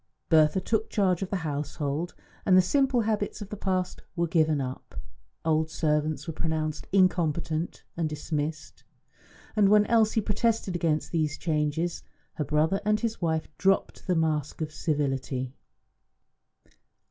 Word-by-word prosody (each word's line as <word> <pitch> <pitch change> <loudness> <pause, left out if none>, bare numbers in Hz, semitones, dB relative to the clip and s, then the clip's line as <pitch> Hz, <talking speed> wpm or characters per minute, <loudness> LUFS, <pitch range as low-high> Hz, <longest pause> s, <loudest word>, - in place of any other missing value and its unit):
Bertha 155 +2 +5
took 220 +3 -1
charge 185 -4 +1
of 190 - -2
the - - -1
household, 150 +2 -3 0.3
and 185 -1 +5
the - - +8
simple 265 +3 +2
habits 215 -2 -1
of 205 -2 -7
the 210 - -5
past 185 -2 -2
were 170 -1 +1
given 155 -3 +2
up. 130 -1 -6 0.5
Old 160 0 +2
servants 155 -1 0
were 165 - -4
pronounced 155 -1 -2
incompetent 170 -3 +1
and 165 -2 -1
dismissed; 150 0 -4 0.7
and 205 -2 +5
when 210 0 +6
Elsie 225 -1 +3
protested 215 -1 0
against 160 -3 0
these 155 -3 0
changes, 160 +1 -1 0.3
her 150 - -2
brother 155 +7 +1
and 210 +1 +2
his 225 -3 -2
wife 160 -2 0
dropped 195 +1 +1
the 180 - +2
mask 155 -3 0
of 155 -1 -3
civility. 135 -4 -1
165 Hz, 140 wpm, -27 LUFS, 150-195 Hz, 0.7 s, the